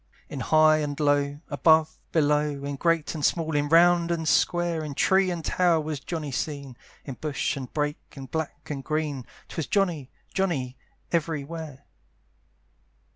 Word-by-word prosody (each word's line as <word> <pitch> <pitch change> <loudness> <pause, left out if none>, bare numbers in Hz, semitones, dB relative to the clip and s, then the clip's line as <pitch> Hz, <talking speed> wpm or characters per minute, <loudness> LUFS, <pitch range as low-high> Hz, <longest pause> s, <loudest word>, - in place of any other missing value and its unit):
In - - -6
high 155 0 +5
and 145 -1 -3
low, 145 0 +1
above, 160 +1 +3
below, 150 -2 +1
In 140 0 -3
great 165 +1 +1
and 155 -3 -5
small, 160 0 +1
in 145 0 +1
round 170 +1 +5
and 165 -2 -1
square, 170 +2 +2
In 145 -2 -6
tree 190 +4 +3
and 170 -3 -4
tower 175 -3 +3
was 155 -2 -3
Johnny 155 -1 -5
seen, 140 -1 -4 0.3
In 135 - -5
bush 150 0 -1
and 130 -3 -7
brake, 150 +1 -3
in 135 -2 -7
black 150 0 -5
and 135 -2 -4
green, 150 -4 -2 0.2
'Twas 160 - -4
Johnny, 175 -10 0 0.2
Johnny, 145 -10 -1 0.4
every 160 -3 0
where. 150 -3 -8
155 Hz, 155 wpm, -26 LUFS, 145-165 Hz, 0.4 s, high